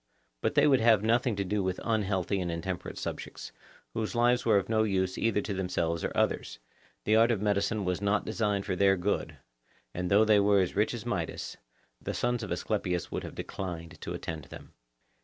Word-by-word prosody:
But - - 0
they - - +5
would 135 -3 +5
have 110 -3 +5
nothing 115 +1 +2
to 100 - -1
do 100 +2 -1
with 95 -1 -2
unhealthy 100 -3 0
and 85 -1 -2
intemperate 85 +2 -4
subjects, - - -6 0.4
whose 110 +1 -3
lives 120 +1 +3
were 110 -3 +4
of 95 -1 0
no 110 -1 +2
use 95 -3 0
either 110 -2 +1
to 100 - -4
themselves 85 -3 -1
or - - -1
others; - - 0 0.5
the 110 - +3
art 115 +1 +5
of 115 -4 +1
medicine 105 0 0
was 90 +1 -1
not 100 +1 +1
designed 105 -3 -1
for 95 - -1
their 95 +1 +4
good, 95 +3 -2 0.6
and 90 0 -2
though 105 +2 +5
they 105 -1 +5
were 100 0 +4
as 90 -2 0
rich 105 +4 +1
as 120 - -7
Midas, 90 -9 -3 0.5
the - - -4
sons 120 0 0
of 110 - -6
Asclepius 90 -1 -2
would - - -3
have - - -8
declined 85 -3 -6
to - - -4
attend 80 -3 -6
them. - - -12
100 Hz, 200 wpm, -29 LUFS, 90-110 Hz, 0.6 s, they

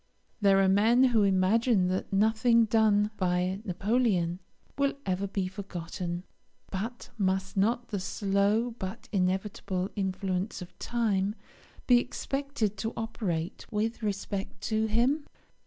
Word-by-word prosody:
There 195 -1 +5
are 195 - +4
men 220 +6 +5
who 240 -4 +4
imagine 195 +1 +3
that 185 +1 -2
nothing 220 +3 +4
done 215 -1 +3
by 180 +1 0
Napoleon 195 -3 +1 0.4
will 280 0 +1
ever 190 +1 -1
be 195 -1 -2
forgotten; 180 -2 -5 0.5
but 225 +6 -5
must 190 -1 0
not 230 +5 +1
the 205 - -2
slow 200 +4 +1
but 190 +4 -6
inevitable 190 -1 -1
influence 190 0 -2
of 180 -2 -10
time 210 -4 0 0.5
be 245 -1 +6
expected 275 -6 -2
to 225 +2 -3
operate 190 -7 -3
with 225 +2 -1
respect 200 -1 -3
to 220 +1 0
him? 250 +7 +1
200 Hz, 125 wpm, -29 LUFS, 190-225 Hz, 0.5 s, be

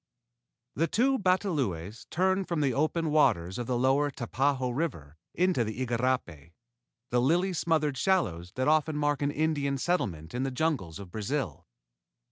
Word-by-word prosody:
"_] - - -62 0.7
The 165 +5 +1
two 265 +7 +2
batalões 140 - -1
turned 190 +2 +1
from 170 -3 -1
the 135 -3 +2
open 155 +3 0
waters 110 - +2
of 120 - -4
the 125 - 0
lower 135 +4 +2
Tapajos 130 0 -1
River 85 - -3 0.2
into 180 -8 +2
the 115 +4 -3
igarapé, 115 - -2 0.6
the 120 0 +3
lily 175 +8 +2
smothered 155 -5 0
shallows 95 - 0
that 130 +2 0
often 155 0 +2
mark 145 -1 0
an 140 - +1
Indian 145 -2 0
settlement 95 - -2
in 125 - -2
the 135 - 0
jungles 130 - -1
of 100 -3 -10
Brazil. 110 - -3
135 Hz, 155 wpm, -29 LUFS, 115-160 Hz, 0.7 s, the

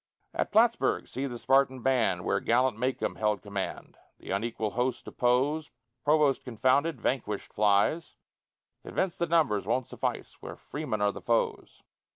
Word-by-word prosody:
At - - -2
Plattsburg, 230 +2 +3
see 135 +2 -3
the 120 -2 -6
Spartan 130 0 +2
band, 115 -9 +1
Where - - +1
gallant 125 +1 +2
Macomb 125 +3 -2
held 105 -3 0
command, 100 -2 -5 0.2
The - - -9
unequal 110 +1 -2
host 125 +1 -2
oppose; 135 +5 +1 0.3
Provost 150 -2 +3
confounded, 130 +6 +1
vanquished 105 -6 -2
flies, 105 +10 +2 0.7
Convinced 185 -3 -2
that 170 - 0
numbers 155 -12 +2
won't 130 -1 +1
suffice - - -4
Where - - -7
Freemen 140 -8 -4
are 105 - +3
the - - -9
foes. 115 -1 -1
125 Hz, 145 wpm, -29 LUFS, 110-145 Hz, 0.7 s, Plattsburg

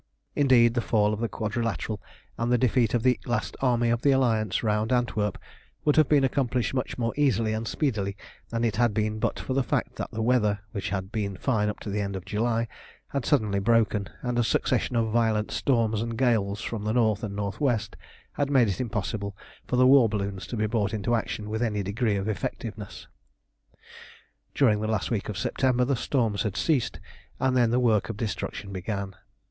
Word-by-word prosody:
Indeed, 125 -5 +5
the 120 - 0
fall 105 -2 +2
of 105 - -3
the 115 0 -1
Quadrilateral 110 -1 -2 0.3
and 120 +1 -1
the 125 - +5
defeat 120 -1 +2
of 115 - 0
the 125 -1 +3
last 120 - -1
army 120 -3 +2
of 120 0 0
the 140 - +3
Alliance 115 -7 +2
round 105 +1 0
Antwerp 110 -5 0 0.5
would 150 - +4
have 155 -3 +4
been 145 -2 +4
accomplished 125 -2 0
much 130 -1 -2
more 115 -1 -1
easily 115 -7 +2
and 110 +1 -3
speedily 100 -9 -1 0.3
than 115 0 -2
it 115 -2 0
had 120 -3 +2
been 110 0 0
but - - -1
for 130 - -3
the 135 - +2
fact 125 - -2
that - - -4
the 110 - -3
weather, 105 -4 +2
which 100 -4 -3
had 95 0 -3
been 100 -3 -3
fine 105 -3 +1
up 105 - -5
to - - -6
the 105 +1 -1
end 100 -1 -3
of 95 - -6
July, 115 +2 0 0.4
had 140 -3 -3
suddenly 105 -8 +2
broken, 110 -1 +2
and 125 -1 0
a - - +4
succession 125 +1 0
of 115 -1 +1
violent 110 -2 +1
storms 115 -5 +1
and 115 0 -3
gales 110 -5 +1
from 110 -2 -4
the 110 +1 0
north 110 -4 +2
and 100 -2 -4
north 100 +5 -4
west 115 -7 0 0.4
had 140 -1 -1
made 130 -5 +4
it 95 +1 -2
impossible 105 -3 -3 0.3
for - - 0
the 130 +1 +5
war 130 -3 +6
balloons 100 -2 -3
to 120 - -4
be 105 - +1
brought 110 -1 0
into 110 +3 -1
action 110 -2 -2
with 110 +2 -3
any 105 -4 0
degree 105 +2 0
of 100 +1 -2
effectiveness. 110 0 -5 1.5
During 110 -7 +3
the 110 - -1
last 110 -1 -1
week 110 -3 -1
of 105 - -4
September 125 +3 +1
the 135 +1 +1
storms 115 -5 0
had 100 -4 -2
ceased, 140 -8 0 0.4
and 130 -1 +1
then 120 -2 +4
the 120 +2 +2
work 115 -4 +2
of 110 - -4
destruction 105 -2 -4
began. 100 0 -4
115 Hz, 205 wpm, -26 LUFS, 105-120 Hz, 1.5 s, war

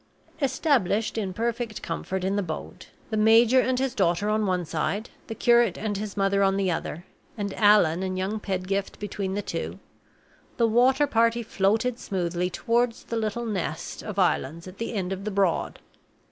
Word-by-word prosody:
Established 260 - +1
in 205 -4 -2
perfect 230 +1 -3
comfort 190 0 -3
in 195 +1 0
the 205 - +1
boat 160 -5 -7 0.2
the 220 - 0
major 225 +4 +6
and 255 0 +1
his 265 -1 0
daughter 180 +2 +1
on 215 -1 +1
one 180 -2 0
side, 205 +7 -2 0.2
the 225 - -5
curate 235 -5 +4
and 210 0 -2
his 205 0 -5
mother 200 0 +2
on 195 0 +3
the 195 -2 +1
other, 170 +1 -4 0.3
and 200 -2 -3
Allan 205 -6 +4
and 185 -1 -2
young 195 +4 -2
Pedgift 195 0 -2
between 200 -2 -4
the 205 - -2
two - - -4 0.8
the 235 - +4
water 255 +5 +4
party 230 -3 +2
floated 220 +4 0
smoothly 180 -1 -2
toward 235 +3 +1
the 230 - -7
little 225 +1 -2
nest 185 -7 -4
of 210 -2 -7
islands 170 -3 0
at 185 +2 -11
the 230 - -3
end 190 -2 -1
of 195 +1 -6
the 215 - -2
Broad. 195 -4 0
205 Hz, 175 wpm, -26 LUFS, 190-230 Hz, 0.8 s, major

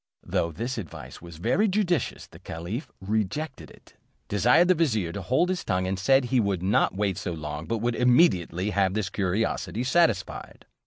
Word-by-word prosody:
Though 85 - -1
this 115 +9 -4
advice 90 -8 -9
was 85 -2 -11
very 190 - +2
judicious, 180 - 0
the - - -16
caliph 90 - -6
rejected 110 +9 -3
it, - - -19 0.4
desired 125 - +4
the - - +7
vizier 115 - 0
to 100 - -5
hold 130 - +1
his 185 -2 -2
tongue, 90 0 0
and 95 +1 -2
said, 135 +7 +4
he 125 +1 +1
would 100 -5 0
not 95 -1 +2
wait 100 -2 -1
so 90 - -3
long, 75 0 -6
but 115 - -1
would 120 0 +1
immediately 105 - +3
have 95 -1 +1
his 105 -3 -2
curiosity 105 +4 -1
satisfied. 125 - 0
105 Hz, 175 wpm, -26 LUFS, 90-130 Hz, 0.4 s, the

